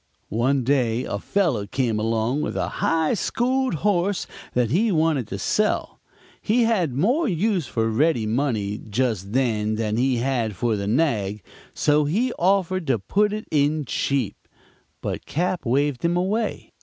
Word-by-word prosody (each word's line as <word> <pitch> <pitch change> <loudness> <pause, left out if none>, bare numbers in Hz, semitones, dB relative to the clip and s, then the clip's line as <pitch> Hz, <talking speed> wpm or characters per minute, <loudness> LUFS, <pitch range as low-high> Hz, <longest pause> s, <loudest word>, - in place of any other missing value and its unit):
"One 130 +5 +1
day 125 -2 +1
a 100 - -3
fellow 145 - 0
came 115 -1 0
along 115 +5 0
with - - -3
a - - -1
high 160 -1 +2
schooled 255 +3 0
horse 195 -1 +1 0.3
that 120 -2 +1
he 210 +8 +2
wanted 155 - +1
to 100 - -5
sell. 210 - 0 0.4
He 235 +3 +2
had 205 - +1
more 250 - +2
use 185 - 0
for 115 -3 0
ready 120 +1 +2
money 110 -3 -1
just 105 -3 -1
then 110 -5 +1
than 110 0 -1
he 130 +1 +2
had 120 -4 -1
for 115 +4 0
the 100 -1 -3
nag, 105 - 0 0.3
so 150 0 +3
he 230 - 0
offered 185 -1 +1
to 130 -3 +2
put 200 - +1
it 215 +1 -4
in 150 0 +1
cheap. 130 -3 -1 0.7
But - - -4
Cap. 175 -2 -1
waved 140 +1 +1
him 170 +1 +2
away. 210 +5 -1
140 Hz, 155 wpm, -23 LUFS, 115-180 Hz, 0.7 s, so